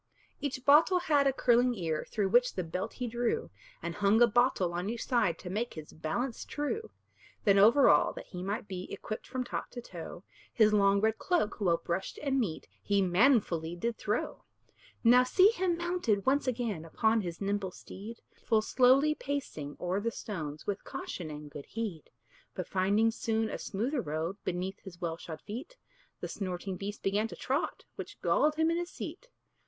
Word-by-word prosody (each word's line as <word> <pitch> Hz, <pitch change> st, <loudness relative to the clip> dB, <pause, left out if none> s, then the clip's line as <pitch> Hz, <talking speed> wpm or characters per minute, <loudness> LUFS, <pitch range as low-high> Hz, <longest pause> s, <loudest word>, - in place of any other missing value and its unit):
Each 265 Hz, -3 st, -4 dB
bottle 310 Hz, +6 st, +6 dB
had 300 Hz, -6 st, +3 dB
a -, -, +4 dB
curling 245 Hz, -1 st, +3 dB
ear, 165 Hz, -6 st, -2 dB
Through 200 Hz, -3 st, 0 dB
which 245 Hz, +4 st, +4 dB
the 185 Hz, -, -1 dB
belt 175 Hz, +3 st, -4 dB
he 250 Hz, -, -4 dB
drew, 240 Hz, 0 st, -1 dB, 0.3 s
And 170 Hz, 0 st, -3 dB
hung 205 Hz, +3 st, +3 dB
a 240 Hz, -, +8 dB
bottle 235 Hz, -6 st, +2 dB
on 180 Hz, +3 st, -2 dB
each 235 Hz, 0 st, -4 dB
side, 220 Hz, -10 st, +2 dB
To 180 Hz, -, -8 dB
make 230 Hz, +5 st, -2 dB
his 155 Hz, -2 st, -9 dB
balance 225 Hz, +11 st, -3 dB
true. 300 Hz, +10 st, -3 dB, 0.5 s
Then 200 Hz, -3 st, +5 dB
over 230 Hz, +8 st, +7 dB
all, -, -, +5 dB
that -, -, -8 dB
he 180 Hz, -, -7 dB
might 205 Hz, +4 st, -3 dB
be 185 Hz, -1 st, -6 dB
Equipped 215 Hz, -, -6 dB
from 255 Hz, 0 st, -2 dB
top 245 Hz, -, -4 dB
to 245 Hz, -, -7 dB
toe, 175 Hz, -5 st, -8 dB, 0.3 s
His 215 Hz, -2 st, +4 dB
long 200 Hz, -1 st, +4 dB
red 220 Hz, +1 st, +1 dB
cloak, 340 Hz, -, 0 dB
well 175 Hz, -4 st, +3 dB
brushed 170 Hz, +3 st, -3 dB
and 270 Hz, -2 st, +1 dB
neat, 190 Hz, -10 st, -2 dB
He 200 Hz, -1 st, +2 dB
manfully 180 Hz, -, +3 dB
did 230 Hz, +6 st, -2 dB
throw. 210 Hz, +1 st, -2 dB, 0.6 s
Now 250 Hz, +2 st, +7 dB
see 370 Hz, +10 st, +5 dB
him 370 Hz, -6 st, 0 dB
mounted 345 Hz, -, 0 dB
once 275 Hz, +1 st, +2 dB
again 230 Hz, -9 st, -1 dB
Upon 220 Hz, +7 st, +2 dB
his 170 Hz, -3 st, -5 dB
nimble 200 Hz, -1 st, -1 dB
steed, 210 Hz, +5 st, -10 dB, 0.2 s
Full 220 Hz, -2 st, +2 dB
slowly 265 Hz, +6 st, +4 dB
pacing 275 Hz, -, -4 dB
o'er 180 Hz, +2 st, -1 dB
the 230 Hz, +3 st, -1 dB
stones, 155 Hz, -10 st, -6 dB
With 205 Hz, -, -3 dB
caution 170 Hz, -4 st, -6 dB
and 150 Hz, -1 st, -8 dB
good 145 Hz, 0 st, -9 dB
heed. 210 Hz, -9 st, -4 dB, 0.5 s
But 185 Hz, -, -4 dB
finding 200 Hz, +4 st, +2 dB
soon 225 Hz, -1 st, -1 dB
a -, -, -4 dB
smoother 245 Hz, +7 st, -2 dB
road 160 Hz, +3 st, -3 dB
Beneath 185 Hz, +2 st, -3 dB
his 180 Hz, -3 st, -12 dB
well 165 Hz, -3 st, -3 dB
shod 160 Hz, -2 st, -8 dB
feet, 265 Hz, -, -8 dB, 0.4 s
The -, -, -3 dB
snorting 185 Hz, -1 st, -4 dB
beast 200 Hz, +2 st, -6 dB
began 205 Hz, +3 st, +1 dB
to -, -, -9 dB
trot, 275 Hz, +5 st, -2 dB
Which -, -, -8 dB
galled 305 Hz, 0 st, +3 dB
him 320 Hz, +1 st, +2 dB
in 335 Hz, -, +1 dB
his 350 Hz, 0 st, -3 dB
seat. -, -, -8 dB
215 Hz, 185 wpm, -31 LUFS, 180-255 Hz, 0.6 s, a